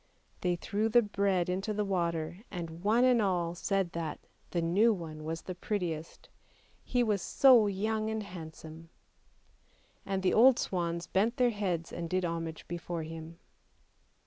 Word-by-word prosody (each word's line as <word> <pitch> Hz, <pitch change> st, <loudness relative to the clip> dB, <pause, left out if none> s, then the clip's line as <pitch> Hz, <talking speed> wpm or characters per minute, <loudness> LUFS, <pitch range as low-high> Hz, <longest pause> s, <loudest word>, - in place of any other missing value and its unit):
They 180 Hz, -1 st, +1 dB
threw 210 Hz, +5 st, -1 dB
the 240 Hz, +1 st, +5 dB
bread 195 Hz, -3 st, +1 dB
into 195 Hz, +4 st, -2 dB
the 210 Hz, 0 st, 0 dB
water, 170 Hz, -3 st, -1 dB
and 170 Hz, -2 st, -6 dB
one 220 Hz, +4 st, +4 dB
and 250 Hz, -2 st, +5 dB
all 175 Hz, -4 st, 0 dB
said 190 Hz, 0 st, -1 dB
that 165 Hz, -2 st, -4 dB, 0.2 s
" -, -, -36 dB
the 175 Hz, -, -1 dB
new 185 Hz, +8 st, +4 dB
one 160 Hz, -6 st, -5 dB
was 160 Hz, +1 st, -4 dB
the 185 Hz, -, -5 dB
prettiest; 175 Hz, -4 st, -4 dB, 0.6 s
he 245 Hz, -1 st, +1 dB
was 210 Hz, -4 st, +1 dB
so 250 Hz, -2 st, +6 dB
young 215 Hz, +2 st, -1 dB
and 220 Hz, -1 st, -2 dB
handsome." 165 Hz, -3 st, -10 dB, 1.1 s
And 195 Hz, -1 st, -2 dB
the 185 Hz, -, +3 dB
old 250 Hz, +3 st, +7 dB
swans 170 Hz, -2 st, -2 dB
bent 220 Hz, +7 st, +1 dB
their 245 Hz, -1 st, +3 dB
heads 180 Hz, -6 st, -2 dB
and 170 Hz, -1 st, -4 dB
did 185 Hz, 0 st, 0 dB
homage 165 Hz, -1 st, -4 dB
before 170 Hz, -1 st, -4 dB
him. 165 Hz, +1 st, -8 dB
180 Hz, 160 wpm, -31 LUFS, 165-210 Hz, 1.1 s, old